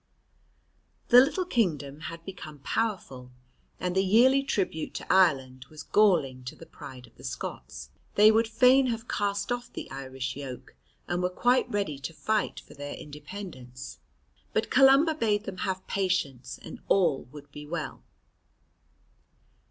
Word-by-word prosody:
The 245 - +10
little 335 +7 +1
kingdom 155 - 0
had 165 0 -10
become 165 -6 -8
powerful, 185 - -2 0.5
and 180 0 -2
the 190 - +4
yearly 245 +8 +5
tribute 190 - -2
to - - -1
Ireland 130 -9 +3
was 155 -1 -10
galling 155 -13 +3
to 125 - -6
the - - -12
pride 130 -2 -11
of - - -23
the - - -15
Scots. 65 +1 -6 0.2
They 210 +1 +8
would 225 +1 +3
fain 255 +4 +5
have 230 -2 -3
cast 200 +1 -1
off 245 0 -3
the - - -7
Irish 130 -1 -5
yoke, 130 -2 -8 0.3
and 175 +1 -1
were 180 - +1
quite 245 +7 +2
ready 200 - -2
to 145 +4 -6
fight 215 +3 -1
for - - -16
their 145 0 -6
independence, 145 -4 -9 0.5
but - - 0
Columba 275 +4 +6
bade 215 -8 0
them 195 -3 -7
have 190 -1 -3
patience, 145 -10 -1
and - - -9
all 175 -8 +2
would 145 +1 -13
be 150 +1 -9
well. 160 -2 -5
180 Hz, 150 wpm, -28 LUFS, 140-220 Hz, 0.5 s, The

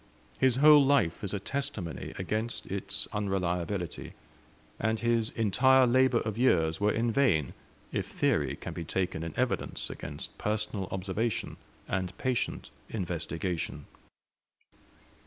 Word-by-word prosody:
His 130 -2 +4
whole 150 +1 +8
life 135 -13 +2
is 100 - -2
a 105 - -2
testimony 105 - -4
against 110 +5 -2
its 100 +1 -3
unreliability, 95 -3 -2 0.7
and 110 +1 0
his 115 -1 +1
entire 130 +5 +4
labor 130 0 +4
of 110 0 -3
years 80 -9 +3
were 105 +1 +4
in 115 +2 +1
vain 105 - +2 0.4
if - - -2
theory - - +1
can - - -7
be 85 - -5
taken 90 -1 -2
in 85 -1 -5
evidence - - -1
against 75 +1 -7
personal 105 -2 -2
observation 100 +4 -2 0.3
and 95 -2 -2
patient 130 -2 -2 0.2
investigation. 85 -5 -3
105 Hz, 120 wpm, -30 LUFS, 90-120 Hz, 0.7 s, whole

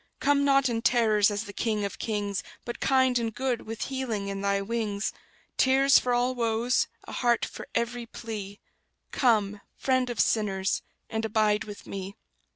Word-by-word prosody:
Come 280 0 +3
not 275 -1 +4
in 230 -2 -1
terrors, 220 -4 +4
as 205 0 -2
the 205 -2 -9
King 215 -1 -1
of 200 - -6
kings; 205 -3 -2 0.2
But 240 - -5
kind 260 -2 +3
and 230 -1 -1
good, 245 +1 -2
with 225 0 -4
healing 235 -7 -3
in 195 0 -4
Thy 200 0 +1
wings: 210 -1 -2 0.4
Tears 270 +1 +5
for 250 - -2
all 245 +1 +2
woes, 235 0 +1 0.2
a - - -10
heart 240 -1 +2
for - - -9
every 235 0 -1
plea; 205 -4 -7 0.5
Come, 210 -5 +2 0.2
Friend 255 -1 +1
of 240 -4 -4
sinners, 195 -3 +1 0.3
and 220 0 -3
abide 215 -1 +2
with 205 -1 -9
me! 195 0 -6
225 Hz, 165 wpm, -27 LUFS, 205-245 Hz, 0.5 s, Tears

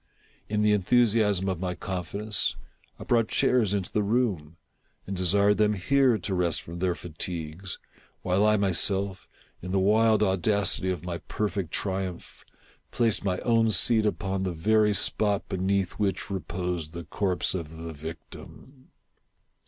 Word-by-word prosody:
In 105 0 0
the 105 - +4
enthusiasm 105 -2 +2
of 95 -3 -2
my 90 -1 -3
confidence, 100 +3 -1 0.4
I - - -7
brought 115 -2 +2
chairs 115 -6 +2
into 100 -3 -2
the 105 - +1
room, 100 -8 -1 0.5
and 95 - -4
desired 100 +3 +3
them 105 0 +3
here 125 +5 +2
to 100 0 -4
rest 90 -2 +1
froi 85 +1 -8
their 90 -1 0
fatigues, 85 +1 -5 0.5
while 95 +3 +2
I 105 0 +4
myself, 95 0 0 0.3
in 90 - -6
the 95 - +1
wild 110 +2 +3
audacity 95 0 +1
of 90 -3 -3
my 85 -1 -4
perfect 100 -1 -3
triumph, 95 -1 -4 0.5
placed 115 -4 +1
my 95 -2 0
own 115 -1 +3
seat 110 0 +3
upon 95 -2 -2
the 95 -2 -2
very 105 +5 +2
spot 105 -1 0
beneath 95 0 0
which 100 -1 -1
reposed 90 -2 -4
the 85 0 -6
corpse 90 +4 -1
of 80 -3 -6
the 80 0 -7
victim. 80 - -11
95 Hz, 145 wpm, -27 LUFS, 90-105 Hz, 0.5 s, the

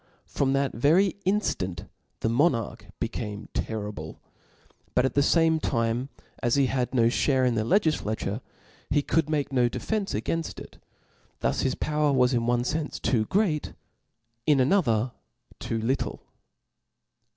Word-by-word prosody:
From' 135 -1 0
that 135 0 +1
very 165 - +3
inftant 95 - -1 0.3
the - - +1
monarch 115 -1 +1
became 105 0 -4
terrible. 105 -8 -4 0.8
But 125 - +4
at 130 - 0
the 140 - +3
fame 160 +2 +3
time 120 -1 -1 0.3
as 120 0 +2
he 140 -1 +4
had 130 0 -1
no 115 -2 +5
(hare 130 +2 +2
m 125 - +2
the 110 - +1
legiflature, 115 - 0 0.5
he 145 0 +2
could 160 0 +1
make 145 -3 -1
no 125 -2 +3
defence 205 - -2
againft 165 0 -2
it; - - -12 0.6
thu^ - - 0
his 130 - 0
power 150 -1 +1
was 130 -1 +3
in 120 -1 +1
one 120 0 +2
fenfe 150 +3 -2
tOo 110 -4 +1
great, 185 - 0 0.7
in 145 -3 +5
another 125 - +2 0.5
too 115 - -2
little. 125 +5 -2
130 Hz, 140 wpm, -26 LUFS, 115-150 Hz, 0.8 s, no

